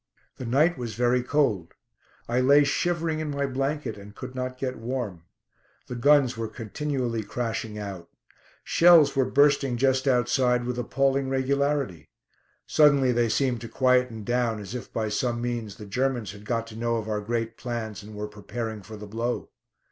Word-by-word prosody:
The 125 - -6
night 150 +7 +3
was 115 -4 -4
very 125 +1 +2
cold. 120 - 0 0.5
I 120 +2 +1
lay 140 +3 +6
shivering 165 +2 0
in 155 -1 -3
my 140 -1 -1
blanket 135 -3 -2
and 100 +1 -12
could 130 0 -8
not 130 0 -4
get 130 -2 -3
warm. 115 -8 -4 0.6
The - - -7
guns 135 0 +4
were 115 0 -3
continually 120 +1 -3
crashing 115 -1 -4
out. 100 -4 -7 0.5
Shells 165 -5 +6
were 135 -1 +2
bursting 140 -3 +3
just 130 +1 +2
outside 125 -1 +2
with 125 0 -2
appalling 135 +2 +1
regularity. 135 - 0 0.6
Suddenly 140 -4 +4
they 120 -1 +2
seemed 125 0 +1
to 115 - -7
quieten 125 -3 +2
down, 120 -1 0
as 100 +1 -8
if 125 - -6
by 110 -1 -1
some 120 +3 -1
means 120 -4 -3
the 105 - -10
Germans 125 0 -1
had 105 0 -13
got 115 +1 -1
to 115 -1 -11
know 115 +1 0
of 110 -2 -3
our 105 -1 -1
great 115 +1 -2
plans 115 -4 -5
and 105 +1 -11
were 105 0 -4
preparing 110 +1 -6
for 110 +3 -10
the 105 - -8
blow. 115 +4 -3
120 Hz, 170 wpm, -26 LUFS, 110-135 Hz, 0.6 s, lay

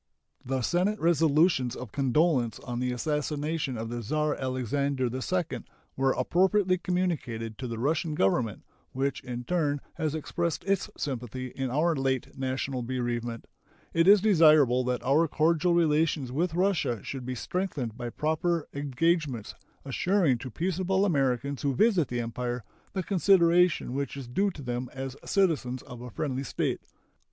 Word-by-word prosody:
The 130 0 -2
Senate 190 - +1
resolutions 160 -5 +3
of 125 -4 -8
condolence 135 -2 +1
on 120 -1 -4
the 125 0 0
assassination 150 +1 -2
of 115 +1 -4
the 120 0 -4
Czar 150 +6 0
Alexander 130 +1 -1
II 170 +6 -2 0.4
were 135 0 +2
appropriately 185 +6 +2
communicated 150 -13 -2
to 130 - -4
the 115 -1 -4
Russian 155 +5 0
Government, 105 0 +1 0.3
which 135 +2 -1
in 125 -1 -5
turn 150 -2 0 0.2
has 155 -2 -1
expressed 170 +2 -2
its 195 0 0
sympathy 130 -1 -4
in 135 +1 -3
our 160 +6 +2
late 135 -2 -1
national 130 0 -2
bereavement. 120 -1 -3 0.5
It 165 +1 +3
is 200 0 +8
desirable 155 - +5
that 125 -1 -1
our 150 +6 +3
cordial 165 +3 +2
relations 155 -5 +2
with 165 +5 -1
Russia 175 - +1
should 135 -2 -5
be 130 +1 -4
strengthened 145 - -3
by 120 0 -5
proper 160 +4 -1
engagements 140 - 0 0.3
assuring 155 -1 +2
to 130 - -6
peaceable 185 - 0
Americans 140 -4 0
who 140 -2 0
visit 200 - +3
the 120 0 -2
Empire 120 +1 -3 0.3
the 190 - -2
consideration 180 -5 +3
which 140 +1 -3
is 135 -3 -7
due 195 +12 +1
to 160 -7 -9
them 125 0 -3
as 135 0 -5
citizens 150 -11 +1
of 120 -1 -10
a 125 - -7
friendly 135 +2 -3
state. 130 - -2
140 Hz, 150 wpm, -28 LUFS, 125-170 Hz, 0.5 s, is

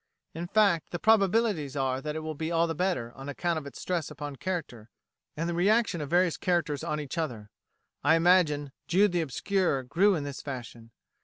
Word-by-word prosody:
In 170 +2 -5
fact, 200 -5 +2
the 175 - -3
probabilities 200 - +2
are 135 -1 0
that 150 +1 -4
it 160 - -3
will 155 0 -4
be 160 +2 -4
all 165 0 +3
the 165 - -2
better, 160 -9 -1
on 135 +1 -8
account 170 +3 -1
of 140 - -10
its 140 - -10
stress 175 -4 -2
upon 145 0 -7
character, 135 -8 -5 0.5
and 165 +2 -1
the 170 - -1
reaction 200 0 +2
of 145 - -5
various 175 0 +2
characters 170 -5 0
on 150 -2 -2
each 145 +2 -4
other. 115 -10 -4 0.5
I 150 +3 +5
imagine 165 -5 +3 0.2
"Jude 195 +3 +4
the 175 -1 +1
Obscure" 160 - 0
grew 185 +10 +3
in 155 - -2
this 140 -1 -6
fashion. 120 -4 -8
160 Hz, 200 wpm, -28 LUFS, 140-180 Hz, 0.5 s, I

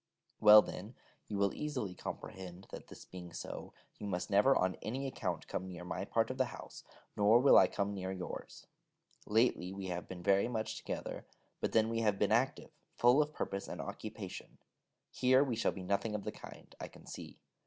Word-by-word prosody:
Well, 105 0 +10
then, 105 +6 -7 0.3
you 105 - -3
will 100 -1 +2
easily 130 -11 -3
comprehend, 95 0 -7
that - - -8
this - - -12
being 90 -2 -9
so, - - -6 0.3
you 105 - -5
must 90 +1 -3
never 105 +8 +5
on 95 0 +1
any 130 +5 -3
account 135 - -3
come 95 - -4
near 90 -1 -8
my 90 +2 -3
part 115 +3 +1
of 130 - -7
the 130 - +4
house, 120 - -10 0.3
nor 105 +3 +6
will 135 +2 +7
I - - +8
come 100 0 -2
near 95 -1 -4
yours. 90 -1 -7 0.6
Lately 110 -4 +2
we 95 -1 -5
have 90 0 -4
been 90 -2 -8
very 100 +2 +4
much 110 -3 -2
together, - - -5 0.3
but - - -2
then 110 -1 +4
we 115 0 -1
have 105 -3 +2
been 105 0 +1
active, 120 +4 +1 0.3
full 125 +5 +6
of 150 0 -1
purpose 100 -8 -4
and - - -6
occupation: - - -7 0.5
here 130 +2 +4
we 130 -5 -1
shall 115 - +1
be 95 - -7
nothing 100 +3 0
of 105 - -3
the - - -3
kind, - - -12
I - - -5
can - - -16
see. - - -9
105 Hz, 195 wpm, -34 LUFS, 95-120 Hz, 0.6 s, Well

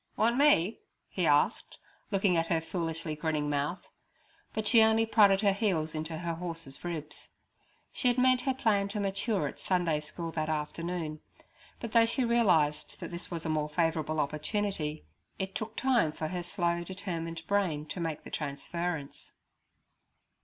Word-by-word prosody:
'Want 230 +3 +3
me?' 250 - +4 0.3
he - - 0
asked, - - +2 0.3
looking 195 -2 +2
at 165 0 +1
her 165 -1 +2
foolishly 165 -1 -3
grinning 150 -1 -1
mouth; 145 +5 -1 0.7
but 220 -1 -2
she 225 +1 +7
only 220 0 +5
prodded 205 -3 +5
her 200 -2 +4
heels 180 -7 0
into 160 +1 -4
her 170 0 -2
horse's 165 -5 -6
ribs. 155 -4 -6 0.6
She 255 - 0
had 245 0 +3
meant 255 0 +4
her 265 +1 +1
plan 205 -5 +2
to 205 +1 -4
mature 195 -2 0
at - - -8
Sunday 175 -5 +1
school 165 +2 -6
that 155 -1 -2
afternoon, 155 +1 -3 0.6
but 230 - -5
though 230 0 +5
she 250 +2 +1
realized 175 -11 +2
that - - -6
this 170 0 -6
was 170 -2 -5
a - - -1
more 155 -1 0
favourable 155 -1 0
opportunity, 155 - -2 0.3
it 190 0 -3
took 220 +1 -5
time 245 -12 +3
for 155 0 -4
her 180 0 -3
slow, 175 -1 -1
determined 170 -3 -5
brain 180 -7 0
to - - -5
make 160 -3 -3
the - - -10
transference. 155 +1 -4
170 Hz, 160 wpm, -30 LUFS, 155-205 Hz, 0.7 s, she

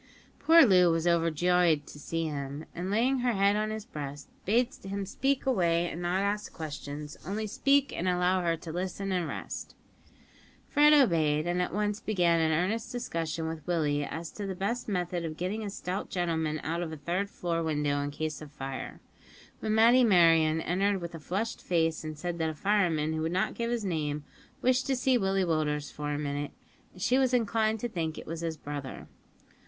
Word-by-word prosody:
Poor 330 -2 +7
Loo 180 -5 +6
was 165 0 +1
overjoyed 170 -1 +3
to 145 - -11
see 165 +3 -2
him, 145 0 -4
and 180 +2 -4
laying 245 +6 +2
her 245 -1 +1
head 200 0 +3
on 215 0 0
his 215 -1 -5
breast, 145 - -7 0.2
bade 240 +5 +2
him 195 +1 -3
speak 270 +8 0
away 175 -9 +2
and 170 - -6
not 180 +3 0
ask 205 +1 -1
questions; 150 -1 -7
only 205 +5 -3
speak, 280 +6 +2
and 185 - 0
allow 180 +1 +2
her 170 -1 0
to 160 - -8
listen 185 +3 -3
and 180 -3 0
rest. - - -6 0.9
Fred 295 +1 +5
obeyed, 165 - +4
and 175 +1 0
at 180 - -1
once 210 +1 -1
began 175 -5 +2
an 160 -1 +2
earnest 215 +9 0
discussion 165 - -3
with 160 -1 -5
Willie 150 -4 +1
as 165 +3 -5
to 205 -2 -5
the 190 - -3
best 215 +6 -2
method 180 -2 -1
of 155 -1 -5
getting 200 +5 -2
a 205 - -3
stout 190 0 -4
gentleman 160 -3 -1
out 165 +2 -2
of 165 -2 -4
a 160 - -6
third 180 +7 -2
floor 170 -3 -2
window 150 -3 0
in 145 - -2
case 155 0 -4
of 150 -2 -10
fire, 135 -2 -6 0.6
when 215 0 -1
Matty 235 +3 +6
Merryon 165 -6 +5
entered 195 +4 +1
with 170 -1 -6
a 165 - -7
flushed 200 +9 -3
face 165 -2 0
and 155 -1 -6
said 175 +2 -4
that 160 -1 +1
a 155 - -5
fireman 165 -4 +1
who 160 - -2
would 160 +1 -1
not 185 - 0
give 235 0 -2
his 235 -3 -1
name 150 -4 -2 0.4
wished 255 +1 +2
to 270 - +2
see 260 +1 +2
Willie 195 -1 +1
Willders 150 -3 -1
for 150 0 -4
a 145 - -1
minute; 145 0 -3 0.4
and 185 - -14
she 250 +4 +3
was 260 -1 +3
inclined 220 -1 +1
to 240 - -1
think 165 -7 -3
it - - -8
was 165 +1 -5
his 165 -2 -3
brother. 145 -3 -7
175 Hz, 200 wpm, -29 LUFS, 155-205 Hz, 0.9 s, Poor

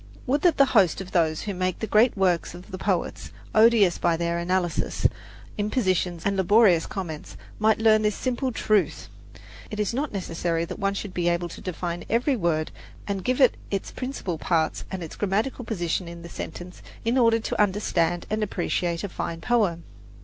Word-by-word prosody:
Would 280 +3 +1
that 350 -1 +3
the 275 - +7
host 190 -8 +4
of 190 -1 -7
those 160 -3 +1
who 205 - -3
make 185 -1 -1
the - - -3
great 220 +2 +3
works 180 -3 +1
of 180 +4 -12
the 185 - -6
poets - - -2 0.2
odious 220 -5 +5
by 170 -1 +2
their 170 0 -1
analysis, 175 0 -1 0.5
impositions 185 -6 0
and 200 0 +1
laborious 190 -2 +4
comments 155 - -6 0.2
might 220 0 +4
learn 220 -1 +4
this 210 -1 +1
simple 255 +1 -1
truth! 215 -3 0 0.6
It 210 - -6
is 210 +1 0
not 280 +4 -2
necessary 170 -3 -2
that 185 - -7
one 200 -1 0
should 195 -1 -5
be 175 -1 +1
able 175 0 -1
to - - -10
define 175 -1 -4
every 245 +5 +2
word 170 -7 0 0.4
and 195 -2 -2
give 255 +5 0
it 260 -3 +6 0.2
its 195 -1 -3
principal 255 - -4
parts 160 -2 0
and 190 -2 -5
its 160 - -8
grammatical 215 +6 -1
position 175 -4 -2
in 170 0 -9
the 170 - -9
sentence 180 +1 -8 0.2
in 230 +2 +2
order 230 -3 +4
to 220 - -1
understand 175 -4 +1
and 215 0 0
appreciate 175 -3 -1
a - - -1
fine 170 -1 -4
poem. 195 -6 +1
190 Hz, 185 wpm, -25 LUFS, 170-220 Hz, 0.6 s, the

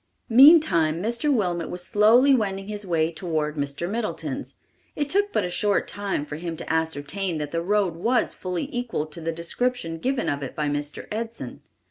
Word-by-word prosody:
Meantime 230 - +6
Mr. 235 +9 0
Wilmot 180 - 0
was 180 0 -6
slowly 230 +8 +5
wending 195 -5 0
his 210 -1 -5
way 165 -2 +1
toward 155 -4 -2
Mr. 145 +3 -3
Middleton's. 220 +3 -4 0.4
It 290 -1 -2
took 405 +1 +2
but 210 - 0
a - - -3
short 205 +2 +1
time 200 -7 -3
for 150 0 -6
him 165 0 -5
to - - -3
ascertain 160 +3 -1
that 150 -1 -4
the 165 - -1
road 195 -1 +1
was 235 +8 +1
fully 180 -2 -3
equal 245 -10 -2
to 155 +2 -9
the 165 +1 -2
description 170 +1 -2
given 260 +6 -1
of 140 0 -1
it 135 - -6
by 150 -1 -1
Mr. 145 0 -3
Edson. 225 +2 -5
180 Hz, 180 wpm, -24 LUFS, 160-230 Hz, 0.4 s, Meantime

